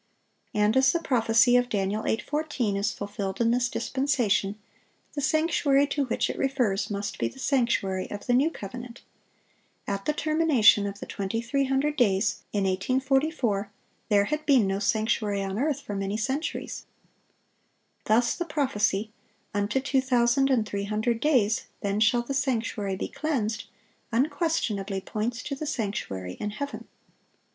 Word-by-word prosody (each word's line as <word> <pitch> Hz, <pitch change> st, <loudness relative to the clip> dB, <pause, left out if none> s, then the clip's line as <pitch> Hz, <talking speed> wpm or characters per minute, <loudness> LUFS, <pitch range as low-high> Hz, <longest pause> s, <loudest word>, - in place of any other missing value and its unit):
And 210 Hz, +1 st, +3 dB
as 265 Hz, 0 st, +5 dB
the 340 Hz, -, 0 dB
prophecy 240 Hz, -4 st, +3 dB
of 245 Hz, 0 st, +3 dB
Dan. 195 Hz, -3 st, 0 dB
8:14 235 Hz, +1 st, -1 dB
is 200 Hz, +2 st, 0 dB
fulfilled 200 Hz, -1 st, -5 dB
in 230 Hz, -1 st, +3 dB
this 245 Hz, 0 st, +1 dB
dispensation, 245 Hz, -9 st, 0 dB, 0.6 s
the 285 Hz, -, -3 dB
sanctuary 290 Hz, -2 st, +3 dB
to 285 Hz, 0 st, 0 dB
which 240 Hz, -, 0 dB
it -, -, -5 dB
refers 245 Hz, -7 st, 0 dB
must 200 Hz, -1 st, -4 dB
be 115 Hz, -, +1 dB
the 115 Hz, -, -10 dB
sanctuary 235 Hz, -8 st, 0 dB
of 205 Hz, -, -7 dB
the 245 Hz, -, +1 dB
new 275 Hz, +6 st, +4 dB
covenant. 245 Hz, -1 st, -9 dB, 0.8 s
At 195 Hz, 0 st, -3 dB
the 300 Hz, -, +1 dB
termination 300 Hz, -11 st, +4 dB
of 200 Hz, 0 st, -6 dB
the -, -, -5 dB
2300 265 Hz, +8 st, -1 dB
days, 210 Hz, -4 st, +2 dB
in 205 Hz, -2 st, 0 dB
1844, 255 Hz, -, 0 dB, 0.4 s
there 205 Hz, -2 st, +5 dB
had 300 Hz, +7 st, -2 dB
been 265 Hz, -7 st, +5 dB
no 195 Hz, 0 st, -1 dB
sanctuary 210 Hz, -1 st, 0 dB
on 195 Hz, +2 st, -3 dB
earth 285 Hz, 0 st, 0 dB
for 210 Hz, -, -6 dB
many 195 Hz, +1 st, -2 dB
centuries. 265 Hz, +8 st, -3 dB, 1.2 s
Thus 230 Hz, +3 st, +3 dB
the 345 Hz, -, -3 dB
prophecy, 220 Hz, -9 st, 0 dB, 0.4 s
"Unto 205 Hz, +5 st, 0 dB
two 265 Hz, 0 st, +1 dB
thousand 255 Hz, +1 st, +3 dB
and 245 Hz, -5 st, +2 dB
three 200 Hz, -1 st, -3 dB
hundred 220 Hz, +3 st, 0 dB
days; 230 Hz, -7 st, +2 dB, 0.2 s
then 200 Hz, +1 st, -1 dB
shall 230 Hz, +3 st, +3 dB
the 275 Hz, -, -4 dB
sanctuary 225 Hz, -7 st, -1 dB
be -, -, -3 dB
cleansed," 230 Hz, -9 st, -2 dB, 0.5 s
unquestionably 240 Hz, -, 0 dB
points 225 Hz, +5 st, -3 dB
to 285 Hz, -, -4 dB
the 300 Hz, +2 st, -4 dB
sanctuary 150 Hz, -, -3 dB
in 210 Hz, -, -2 dB
heaven. 280 Hz, +7 st, -6 dB
230 Hz, 150 wpm, -27 LUFS, 205-270 Hz, 1.2 s, as